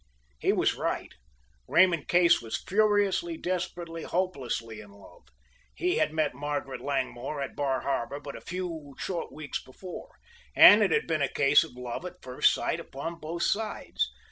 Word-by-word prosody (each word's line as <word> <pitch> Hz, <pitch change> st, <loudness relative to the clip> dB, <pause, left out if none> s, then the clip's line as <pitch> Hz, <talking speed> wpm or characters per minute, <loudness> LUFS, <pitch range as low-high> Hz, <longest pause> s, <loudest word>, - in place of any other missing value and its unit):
He -, -, +2 dB
was -, -, +2 dB
right, -, -, -3 dB, 0.5 s
Raymond 170 Hz, -4 st, +4 dB
Case 175 Hz, -1 st, +5 dB
was 115 Hz, -1 st, -3 dB
furiously, 210 Hz, -, +2 dB
desperately, 175 Hz, -, -4 dB
hopelessly 130 Hz, -, -3 dB
in 105 Hz, -, -14 dB
love. 100 Hz, -3 st, -17 dB, 0.5 s
He 360 Hz, +1 st, 0 dB
had -, -, +2 dB
met 155 Hz, -2 st, 0 dB
Margaret 145 Hz, -2 st, -4 dB
Langmore 135 Hz, 0 st, -3 dB
at 140 Hz, -, -4 dB
Bar 135 Hz, -3 st, 0 dB
Harbor 140 Hz, 0 st, -2 dB
but 145 Hz, -1 st, -8 dB
a -, -, -9 dB
few 165 Hz, -6 st, -6 dB
short 175 Hz, -3 st, -4 dB
weeks 150 Hz, -2 st, -5 dB
before, 185 Hz, -, -10 dB, 0.4 s
and 210 Hz, +2 st, +10 dB
it 205 Hz, -, +4 dB
had -, -, +2 dB
been 160 Hz, -2 st, -1 dB
a 140 Hz, -, +1 dB
case 140 Hz, +1 st, +5 dB
of -, -, -11 dB
love 125 Hz, +4 st, -5 dB
at 180 Hz, 0 st, -13 dB
first 125 Hz, 0 st, +3 dB
sight -, -, -1 dB
upon 165 Hz, +5 st, -6 dB
both 165 Hz, +3 st, -4 dB
sides. 215 Hz, 0 st, -1 dB
155 Hz, 165 wpm, -28 LUFS, 135-180 Hz, 0.5 s, and